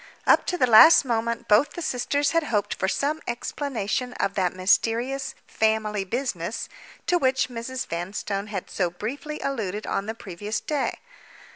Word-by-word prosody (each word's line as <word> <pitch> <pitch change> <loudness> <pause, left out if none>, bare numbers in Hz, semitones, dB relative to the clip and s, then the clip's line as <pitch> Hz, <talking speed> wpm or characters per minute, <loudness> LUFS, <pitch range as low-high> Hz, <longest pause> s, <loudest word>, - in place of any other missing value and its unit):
Up - - +4
to 360 - 0
the 255 - +4
last 250 +7 +8
moment, 235 -1 -1
both 235 +8 +4
the 345 - -6
sisters 285 +2 0
had 330 -1 +1
hoped 205 -6 0
for 190 - -2
some 290 +10 -1
explanation 245 -1 -3
of 200 -4 -1
that 185 -3 +1
mysterious 230 +8 +1
"family 220 -2 0
business" 210 -3 -3 0.4
to 355 - +2
which 260 -2 +1
Mrs. 245 +1 -4
Vanstone 195 +4 -4
had 200 -3 -5
so 180 -3 0
briefly 275 - -5
alluded 215 -7 -3
on 195 - -2
the 220 - -3
previous 205 +1 -5
day. 290 -3 -2
230 Hz, 155 wpm, -25 LUFS, 200-270 Hz, 0.4 s, last